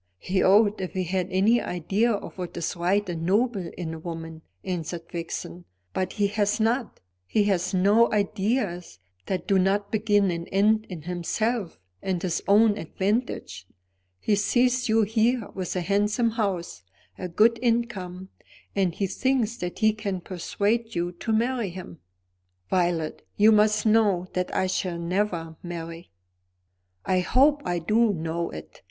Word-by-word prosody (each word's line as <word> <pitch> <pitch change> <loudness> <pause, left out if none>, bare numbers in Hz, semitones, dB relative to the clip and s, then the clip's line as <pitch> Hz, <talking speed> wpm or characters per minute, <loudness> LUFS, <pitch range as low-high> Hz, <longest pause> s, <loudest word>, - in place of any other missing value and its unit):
"He 185 - 0
ought, 205 +1 +4
if 185 - -4
he 185 - -1
had 180 0 -1
any 205 +6 +3
idea 195 +7 0
of 205 - -4
what 180 -1 -5
is 170 - -2
right 190 +4 +1
and 170 -2 -4
noble 200 0 +1
in 165 -3 -4
a 160 - -7
woman," 165 -1 -7 0.2
answered 175 -2 -4
Vixen. 170 +1 -6 0.3
"But 185 - -2
he 205 - +1
has 205 +1 0
not. 230 +2 0 0.3
He 210 - +2
has 190 -3 0
no 205 +5 +4
ideas 200 - -1 0.3
that 185 -3 -2
do 195 -1 +4
not 200 +2 +1
begin 205 -3 +2
and 170 0 -5
end 215 +3 +3
in 170 -5 -7
himself 180 +4 -2 0.2
and 185 -2 -1
his 170 -2 -2
own 210 +1 +5
advantage. 195 - -2 0.5
He 210 - 0
sees 245 +4 +2
you 220 0 +4
here 225 +2 +1
with 185 -1 -4
a 180 - 0
handsome 210 +5 +1
house, 195 - -2 0.4
a 185 - -3
good 225 +6 +3
income, 200 -7 -1 0.5
and 190 -4 +1
he 200 - 0
thinks 235 +3 0
that 180 -4 -5
he 215 -1 +3
can 205 -3 -3
persuade 205 +6 -2
you 175 +1 -1
to 180 +6 -4
marry 235 -1 +1
him." 175 -2 -9 0.7
"Violet, 175 -4 0 0.2
you 215 +2 +6
must 215 0 +3
know 210 -5 +3
that 180 0 -1
I 190 - +2
shall 185 -1 -1
never 170 -2 -2
marry." 170 -1 -7 1.0
"I 185 - +2
hope 280 +10 +3
I 175 0 0
do 215 +7 +2
know 165 0 -3
it. 80 0 -10
195 Hz, 155 wpm, -26 LUFS, 175-220 Hz, 1.0 s, you